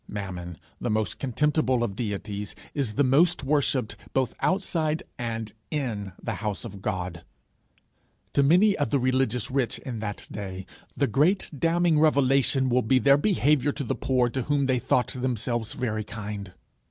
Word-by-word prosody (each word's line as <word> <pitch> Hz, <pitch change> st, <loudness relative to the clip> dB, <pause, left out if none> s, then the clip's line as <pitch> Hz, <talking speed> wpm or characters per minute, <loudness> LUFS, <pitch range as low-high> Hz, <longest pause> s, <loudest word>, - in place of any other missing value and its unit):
Mammon, 90 Hz, -4 st, -6 dB, 0.2 s
the 120 Hz, -, -2 dB
most 110 Hz, -4 st, -1 dB
contemptible 135 Hz, -1 st, +1 dB
of 100 Hz, -5 st, -2 dB
deities, 105 Hz, -2 st, -4 dB, 0.2 s
is 130 Hz, -8 st, -2 dB
the 145 Hz, -, +3 dB
most 145 Hz, +6 st, +3 dB
worshipped, 135 Hz, -6 st, +1 dB, 0.2 s
both 130 Hz, -2 st, +1 dB
outside 165 Hz, -5 st, 0 dB, 0.2 s
and 115 Hz, -2 st, -4 dB, 0.2 s
in 110 Hz, -, -3 dB
the -, -, -3 dB
house 105 Hz, +1 st, -3 dB
of 100 Hz, -4 st, -8 dB
God: 90 Hz, -3 st, -3 dB, 1.1 s
to 140 Hz, -, +4 dB
many 180 Hz, +9 st, +5 dB
of 145 Hz, -, -1 dB
the 145 Hz, -, +2 dB
religious 130 Hz, -2 st, 0 dB
rich 130 Hz, -3 st, 0 dB
in 120 Hz, -4 st, -6 dB
that 105 Hz, -1 st, -5 dB
day, 95 Hz, -2 st, -6 dB, 0.3 s
the -, -, +3 dB
great 155 Hz, -, +2 dB
damning 165 Hz, +2 st, +2 dB
revelation 135 Hz, -3 st, +3 dB
will 125 Hz, 0 st, +3 dB
be 130 Hz, +3 st, +3 dB
their 140 Hz, +2 st, +5 dB
behaviour 145 Hz, -, +2 dB
to 140 Hz, -, -4 dB
the 120 Hz, -, -1 dB
poor 130 Hz, -2 st, +1 dB
to 130 Hz, +2 st, -2 dB
whom 140 Hz, +2 st, +1 dB
they 130 Hz, -2 st, +2 dB
thought 125 Hz, +1 st, +1 dB
themselves 120 Hz, -3 st, -2 dB
very 110 Hz, -4 st, -2 dB
kind. 105 Hz, -2 st, -6 dB
125 Hz, 160 wpm, -26 LUFS, 105-140 Hz, 1.1 s, many